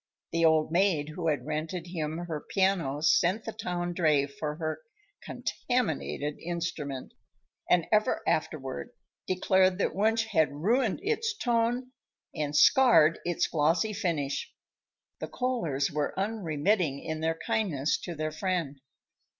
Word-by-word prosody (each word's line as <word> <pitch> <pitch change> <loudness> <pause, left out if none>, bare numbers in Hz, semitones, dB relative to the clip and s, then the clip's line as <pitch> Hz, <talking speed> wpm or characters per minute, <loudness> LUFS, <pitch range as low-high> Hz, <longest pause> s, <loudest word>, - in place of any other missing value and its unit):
The 165 0 +1
old 160 -1 +3
maid 170 -4 +2
who 165 +2 -4
had 145 -5 0
rented 160 +3 -3
him 160 -3 -4
her 155 -3 -4
piano 185 -8 +1
sent 185 +5 +3
the 225 - -3
town 175 -4 -3
dray 155 -5 +3
for 150 +2 -5
her 160 - -4 0.4
contaminated 160 - -2
instrument, 165 -6 -4 0.6
and 175 -2 +4
ever 215 0 +2
afterward 135 - -2 0.3
declared 185 0 +3
that 200 - 0
Wunsch 225 +3 +2
had 160 -10 +2
ruined 215 - +1
its 450 +1 -1
tone 245 - 0 0.4
and 150 -1 -3
scarred 170 - +6
its 175 -1 +1
glossy 165 +7 +1
finish. 160 -9 -2 0.7
The - - -4
Kohlers 170 - -1
were 150 -1 -2
unremitting 185 -6 0
in 160 -1 -4
their 165 +1 -1
kindness 160 -11 0
to 175 - -6
their 155 0 -2
friend. 155 -4 -2
170 Hz, 130 wpm, -29 LUFS, 150-200 Hz, 0.7 s, scarred